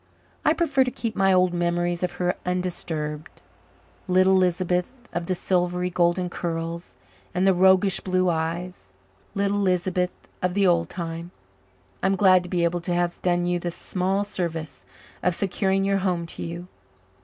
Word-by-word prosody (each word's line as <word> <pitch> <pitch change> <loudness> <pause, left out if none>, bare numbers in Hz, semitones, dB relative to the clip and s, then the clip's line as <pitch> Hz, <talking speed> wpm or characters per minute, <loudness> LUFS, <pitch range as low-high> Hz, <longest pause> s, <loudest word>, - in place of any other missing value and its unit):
I - - +4
prefer 295 -6 +2
to 255 - -1
keep 230 -2 -4
my 195 0 +3
old 185 -1 +3
memories 175 0 0
of 180 -1 -1
her 180 0 0
undisturbed 170 -4 -3 0.7
little 185 +1 +4
Lisbeth 185 +6 0
of 175 0 -3
the 185 - 0
silvery 180 0 0
golden 175 +1 +2
curls 170 -1 -4 0.4
and 180 +1 +2
the 195 - +5
roguish 190 +1 +4
blue 185 -1 +1
eyes. 170 - -2 0.5
Little 200 0 +1
Lisbeth 180 -1 0 0.2
of 180 0 0
the 200 -1 +3
old 170 -2 +3
time! 170 -1 -5 0.7
I'm 195 0 +2
glad 185 -1 +5
to 180 - -9
be 175 -2 0
able 170 +1 0
to 175 +1 -1
have 175 0 -1
done 175 -1 +1
you 175 0 0
the 175 - -3
small 190 +3 -1
service 165 -7 -5 0.3
of 180 -1 +1
securing 195 0 0
your 195 0 +2
home 180 -3 0
to - - -8
you. 170 +1 -6
180 Hz, 160 wpm, -25 LUFS, 175-190 Hz, 0.7 s, the